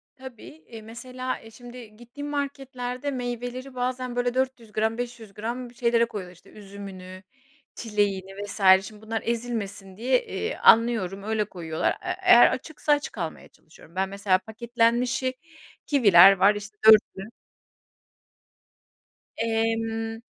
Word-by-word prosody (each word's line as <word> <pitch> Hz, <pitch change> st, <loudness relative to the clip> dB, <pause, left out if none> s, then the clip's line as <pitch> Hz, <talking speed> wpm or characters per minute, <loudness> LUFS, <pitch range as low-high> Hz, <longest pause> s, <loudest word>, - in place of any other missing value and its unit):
Tabii, 260 Hz, -3 st, -12 dB, 0.2 s
eee, 225 Hz, -2 st, -10 dB
mesela, 255 Hz, +3 st, -6 dB
eee, 225 Hz, -, -15 dB
şimdi 240 Hz, -1 st, -12 dB
gittiğim 240 Hz, +5 st, -9 dB
marketlerde 270 Hz, -2 st, -4 dB
meyveleri 245 Hz, +1 st, -5 dB
bazen 250 Hz, 0 st, -3 dB
böyle 245 Hz, 0 st, 0 dB
400 260 Hz, -4 st, -2 dB
gram, 220 Hz, +1 st, -1 dB
500 235 Hz, -4 st, -7 dB
gram 235 Hz, +4 st, -5 dB
şeylere 235 Hz, -1 st, +2 dB
koyuyorlar 185 Hz, -6 st, -8 dB
işte 185 Hz, -, -21 dB
üzümünü 195 Hz, -2 st, -10 dB, 0.5 s
çileğini 200 Hz, -3 st, -2 dB
vs. 205 Hz, +1 st, -7 dB, 0.3 s
şimdi 210 Hz, -1 st, -13 dB
bunlar 220 Hz, 0 st, -4 dB
ezilmesin 215 Hz, -5 st, -4 dB
diye, 260 Hz, -, +1 dB
eee, 450 Hz, +1 st, -4 dB
anlıyorum 220 Hz, -5 st, +3 dB
öyle 215 Hz, 0 st, -1 dB
koyuyorlar. 165 Hz, -5 st, -2 dB
Eee, -, -, -5 dB
eee, 360 Hz, -, -1 dB
eğer 240 Hz, -10 st, +7 dB
açıksa 300 Hz, +2 st, -3 dB
açık 290 Hz, -5 st, -3 dB
almaya 165 Hz, -4 st, -5 dB
çalışıyorum 160 Hz, +1 st, -20 dB
ben 190 Hz, +1 st, -1 dB
mesela 200 Hz, -1 st, +1 dB
paketlenmişi 235 Hz, +4 st, 0 dB, 0.5 s
kiviler 195 Hz, -, +7 dB
var 195 Hz, +2 st, +4 dB
işte 205 Hz, +1 st, -9 dB
4'lü 215 Hz, -1 st, +5 dB, 2.1 s
Emm. 225 Hz, 0 st, -1 dB
225 Hz, 125 wpm, -25 LUFS, 205-245 Hz, 2.1 s, eğer